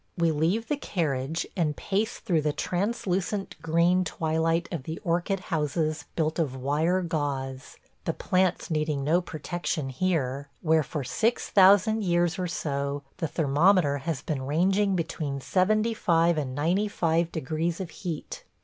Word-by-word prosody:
We 170 -1 +3
leave 170 +9 0
the 295 - 0
carriage 155 - -2
and 160 -5 0
pace 205 +3 -1
through 165 -4 0
the 150 0 0
translucent 195 +1 -2
green 170 +3 +3
twilight 160 0 0
of 170 -5 -3
the 160 +5 -5
orchid 175 +3 0
houses 155 0 0
built 160 0 0
of 145 -6 0
wire 155 +8 +1
gauze, 140 -5 -3 0.3
the - - +1
plants 185 -1 0
needing 150 -2 0
no 165 +5 +3
protection 160 -3 -3
here, 140 -3 -1
where 160 -1 +4
for 145 0 -4
six 230 - 0
thousand 205 +3 +5
years 175 -1 +1
or 180 - -1
so 140 -4 -2
the 170 -3 -1
thermometer 150 0 +3
has 150 -1 -3
been 145 -4 -2
ranging 190 +6 +2
between 155 -4 -3
seventy 215 - +2
five 170 -5 +3
and 135 -4 -3
ninety 175 +8 +1
five 170 -3 0
degrees 160 +3 -2
of 180 -4 -5
heat. 165 -4 -6
165 Hz, 150 wpm, -27 LUFS, 150-185 Hz, 0.3 s, thousand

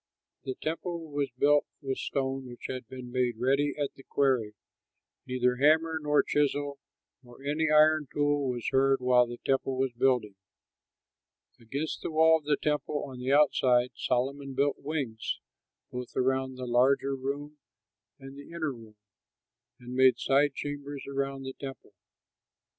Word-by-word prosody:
The 130 - -3
temple 165 0 -4
was 145 -1 -1
built 145 +2 +4
with 135 -2 -3
stone 135 -1 -2
which 120 - -11
had 130 -3 -6
been 125 0 -9
made 125 -2 0
ready 140 +4 +1
at 145 - -1
the - - -15
quarry; 130 -7 0 0.7
neither 125 -1 +1
hammer 160 +3 +3
nor 150 0 +3
chisel 145 -1 0 0.4
nor 125 +1 -16
any 150 +2 0
iron 155 -1 +5
tool 145 -2 +1
was 120 -2 -3
heard 135 0 +3
while 125 -1 +4
the 120 0 -7
temple 135 -1 0
was 130 -1 +1
building. 120 -4 +1 1.3
Against 140 +7 -4
the - - -3
wall 160 0 +5
of 150 - -26
the 145 -1 +2
temple 150 0 -1
on 130 -2 -8
the 130 +2 -1
outside 130 -4 +4
Solomon 135 +2 -2
built 140 +1 +1
wings, 135 -7 -3 0.5
both 125 0 -6
around 130 0 0
the 130 0 -6
larger 135 +3 +2
room 145 +3 -5 0.6
and 135 0 -11
the 140 0 -11
inner 160 -4 -3
room, 110 -3 -14 0.8
and 125 0 -9
made 130 0 +5
side 140 +1 +2
chambers 145 -1 -5
around 135 0 -3
the 130 0 -5
temple. 135 -1 -9
135 Hz, 150 wpm, -29 LUFS, 125-145 Hz, 1.3 s, iron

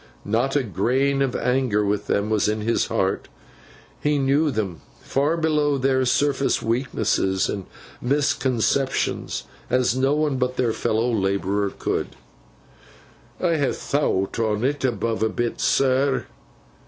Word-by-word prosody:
Not 120 +7 0
a 145 - +3
grain 130 +6 +1
of 135 -2 0
anger 125 -5 +1
with 105 0 -1
them 100 +2 0
was 105 -1 +2
in 110 0 -1
his 115 +2 +1
heart; - - -1 0.7
he 150 0 +2
knew 140 +3 +2
them, 105 - -3 0.2
far 145 +5 0
below 150 -3 +1
their 130 0 +2
surface 140 +1 +1
weaknesses 115 -5 0
and 100 -3 -4 0.3
misconceptions, 130 -1 0 0.3
as 125 -1 +2
no 135 +2 +2
one 150 -3 0
but 125 0 -1
their 120 -3 +1
fellow 115 +3 0
labourer 100 0 0
could. - - -3 1.2
'I 170 -3 +1
ha 140 -3 +1
thowt 115 -9 -1
on 110 -2 0
't, 140 0 +1
above 115 -1 -2
a 110 - +2
bit, 120 +2 -2
sir. 135 +1 +2
125 Hz, 135 wpm, -23 LUFS, 110-140 Hz, 1.2 s, a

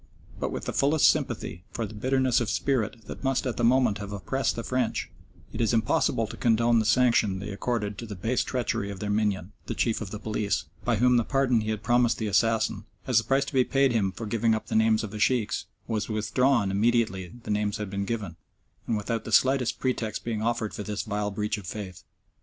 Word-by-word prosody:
But - - -2
with - - -5
the - - -3
fullest 145 +2 +4
sympathy 85 - -4
for 115 - -3
the 105 - -9
bitterness 130 +3 +1
of 115 - -1
spirit 115 -2 -1
that - - -9
must 135 -1 0
at 125 - -2
the 120 - -1
moment 120 -3 +3
have 100 -1 -6
oppressed 135 +7 -1
the 115 - -4
French, 130 -2 -1 0.4
it - - -3
is 115 0 +2
impossible 110 -2 +2
to - - -8
condone 115 0 +3
the 110 - 0
sanction 115 -5 +3
they 100 +2 -5
accorded 105 -1 -2
to 115 - -6
the 105 - -6
base 115 +7 0
treachery 115 -5 -2
of 100 -2 -6
their 105 0 -2
minion, 105 -3 0 0.2
the - - -3
Chief 115 -2 0
of 105 - -5
the 105 - -5
Police, 105 -1 -1 0.2
by 120 - +1
whom 125 +3 +4
the 120 - +3
pardon 130 -2 +2
he 110 - -3
had 110 -1 -3
promised 120 0 +3
the 110 - -3
assassin, 110 +2 +1 0.2
as 125 -3 +4
the - - -3
price 135 +4 +2
to - - -8
be 130 -1 +4
paid 135 0 +2
him 105 -5 +1
for 115 - -7
giving 115 +1 +1
up 110 - -4
the - - -2
names 110 0 +3
of 105 - -5
the 105 - -6
Sheikhs, 120 -1 +1 0.2
was 110 -1 -2
withdrawn 110 0 +2
immediately 100 -4 +1
the - - -4
names 105 0 0
had 105 -3 -5
been 100 0 -2
given, 100 -7 -4 0.5
and 115 - +1
without 110 +2 -2
the - - -7
slightest 130 +2 +3
pretext 120 -4 -2
being 110 -2 -2
offered 115 -1 -1
for 105 - -5
this 105 0 -3
vile 105 -1 -2
breach 105 +1 -2
of 95 - -11
faith. 95 -4 -6
110 Hz, 225 wpm, -27 LUFS, 105-120 Hz, 0.5 s, fullest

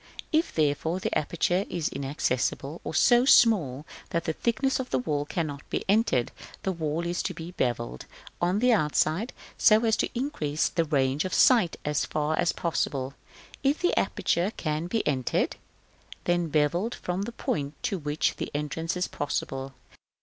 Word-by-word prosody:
If, 320 +2 +2
therefore, 155 +3 +1
the - - -2
aperture 175 +4 +1
be 175 -4 -5
inaccessible, 140 +2 -2
or - - -5
so 240 +6 +5
small 175 - +4 0.2
that 170 -1 -1
the 160 - -1
thickness 240 - 0
of 260 - -4
the - - +1
wall 145 +3 -1
cannot 145 -3 -3
be - - -2
entered, 195 - +2 0.3
the 190 - 0
wall 165 -1 -2
is 175 0 -1
to 185 - -3
be 165 +1 -7
bevelled 120 - -2 0.3
on 175 +3 +2
the 245 +3 +4
outside, 160 - +1 0.3
so 220 +1 +5
as 220 -1 +3
to - - 0
increase 155 - -1
the 165 -1 0
range 140 -1 +1
of 185 - -2
sight 225 -10 +5
as 150 -1 +1
far 155 +1 -1
as 175 - +3
possible; 140 -5 -2 0.5
if 280 +2 +2
the 355 - +1
aperture 180 +5 +1
can 155 +1 -2
be 225 +4 -1
entered, 130 -4 0 0.7
then 175 -1 +1
bevelled 160 +9 +1
from 180 +2 -3
the 220 +4 -3
point 145 -9 -2
to 195 - -1
which 150 0 0 0.2
entrance 160 +4 -2
is 180 - 0
possible. 135 -2 -3
165 Hz, 165 wpm, -27 LUFS, 145-195 Hz, 0.7 s, so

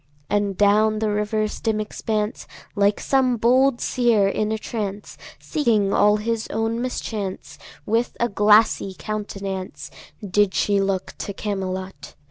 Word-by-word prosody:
And 205 -2 0
down 215 +1 +3
the 215 0 0
river's 210 +1 -1
dim 220 -2 0
expanse 215 0 -3
– - - -26
Like 205 0 +2
some 260 -3 +2
bold 255 +3 +3
seër 225 -6 +2
in 215 0 -1
a 220 - 0
trance, 210 -2 -5 0.2
Seeing 220 -9 +1
all 210 +1 +4
his 225 +1 -2
own 225 +1 -1
mischance 215 -6 -5
– - - -22
With 235 +1 -1
a 235 - +2
glassy 210 -2 +3
countenance 195 0 -5 0.4
Did 200 0 +2
she 200 -1 +2
look 195 -1 -2
to 200 - -4
Camelot. 190 -2 -5
210 Hz, 140 wpm, -22 LUFS, 200-225 Hz, 0.4 s, all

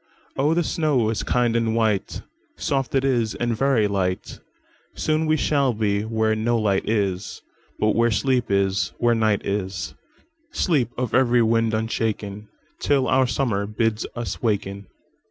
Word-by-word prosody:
Oh, 150 +4 +2
the 175 - +2
snow 145 -10 +1
is 110 - -2
kind 120 -2 +1
and 115 -1 +1
white,—Soft 135 - -2
it 135 0 +2
is, 120 -4 +1
and 120 -1 -1
very 125 -3 +2
light; 95 -2 -2 0.6
Soon 155 0 0
we 155 0 +3
shall 140 -4 +1
be 105 -2 0
where 110 0 0
no 115 +2 +1
light 100 -3 0
is, 100 -4 -2 0.3
But 110 0 +1
where 115 0 +3
sleep 125 +1 0
is, 95 -2 +1
and - - -28
where 120 0 +3
night 110 -3 +1
is,—Sleep 105 - -3
of 125 -1 -2
every 125 -2 +4
wind 115 0 +2
unshaken, 110 -2 -3 0.3
Till 140 -2 +1
our 130 0 +3
Summer 110 -4 -1
bids 110 +1 -1
us 120 -1 -4
waken." 100 -3 -2
115 Hz, 150 wpm, -23 LUFS, 105-130 Hz, 0.6 s, every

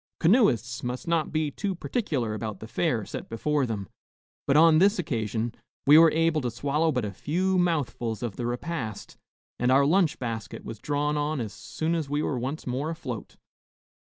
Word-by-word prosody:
Canoeists 160 - +3
must 125 +7 -4
not 165 -2 +1
be 155 -2 0
too 195 +5 -3
particular 150 - -2
about 110 -2 -5
the 110 - -8
fare 115 - 0
set - - -7
before 140 +4 0
them; 100 -4 -4 0.6
but 140 +1 +4
on 160 0 +7
this 200 +4 +4
occasion 115 - -2 0.3
we 145 - +8
were 165 +1 +9
able 160 0 +2
to 125 - -1
swallow 145 +7 0
but 125 -5 -1
a 100 - -5
few 185 - 0
mouthfuls 125 -10 -1
of 115 -5 -3
the 120 - -3
repast 120 -4 -4 0.4
and 125 +1 +2
our 140 +2 +5
lunch 165 0 +3
basket 115 -3 -5
was 115 - -7
drawn 145 +2 -1
on 150 0 -1
as 110 -4 -4
soon 160 +1 -3
as 160 -4 -2
we 145 +1 0
were 130 - -1
once 135 +6 -4
more 130 +5 -2
afloat. 140 -9 -6
145 Hz, 185 wpm, -27 LUFS, 120-165 Hz, 0.6 s, were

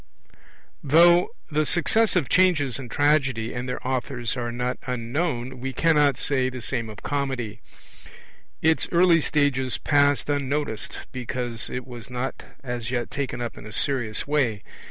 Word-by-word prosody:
Though 170 +5 +5 0.2
the 155 +1 +2
successive 180 - +3
changes 155 -9 +3
in 125 -3 -8
Tragedy 135 -5 +1
and 125 +1 -4
their 125 - -4
authors 125 -2 -2
are 120 -2 -3
not 125 +1 -3
unknown, 125 +1 -2
we 135 +1 -4
cannot 150 -5 +3
say 130 0 0
the 130 0 -7
same 115 -2 -3
of 105 -1 -11
Comedy; 130 -7 -3 1.0
its 160 0 +3
early 170 -1 +5
stages 140 -5 +1
passed 145 -1 +2
unnoticed, 145 -4 -2
because 125 -2 -3
it 125 0 -5
was 120 -3 -9
not 125 +1 -4 0.2
as 120 -3 -4
yet 120 -2 -2
taken 135 -3 -3
up 120 - -5
in - - -10
a - - -9
serious 115 -3 +1
way. 130 -8 0
130 Hz, 145 wpm, -24 LUFS, 120-145 Hz, 1.0 s, Though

